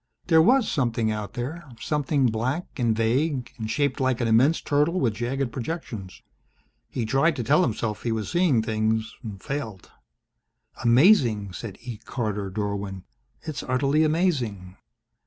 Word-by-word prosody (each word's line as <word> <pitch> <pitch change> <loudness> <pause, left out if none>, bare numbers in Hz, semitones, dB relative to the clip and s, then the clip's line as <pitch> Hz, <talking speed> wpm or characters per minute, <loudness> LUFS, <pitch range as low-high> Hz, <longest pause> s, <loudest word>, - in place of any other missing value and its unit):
There 160 -2 +7
was 250 +6 +4
something 120 -5 0
out 105 -2 -4
there 145 +8 -5 0.2
something 145 +1 0
black 125 +9 -2
and 115 -3 +1
vague 125 +4 0
and 110 -1 -4
shaped 140 +4 0
like 130 -2 +1
an 120 - 0
immense 125 +9 +4
turtle 150 +5 +1
with 120 -5 +1
jagged 120 +3 -2
projections. 115 - -6 0.7
He 120 - -3
tried 135 +7 +2
to 125 - -3
tell 145 +9 +4
himself 110 - -1
he 120 - -1
was 110 -2 -2
seeing 170 -10 +3
things, 110 0 0 0.2
failed. 110 -4 -6 0.9
"Amazing!" 120 - +4
said 100 -1 -7
E. 120 -2 -7
Carter 105 -3 -3
Dorwin. 100 -1 -4 0.4
"It's 155 -3 -4
utterly 140 +4 +1
amazing!" 130 - 0
120 Hz, 140 wpm, -25 LUFS, 110-145 Hz, 0.9 s, There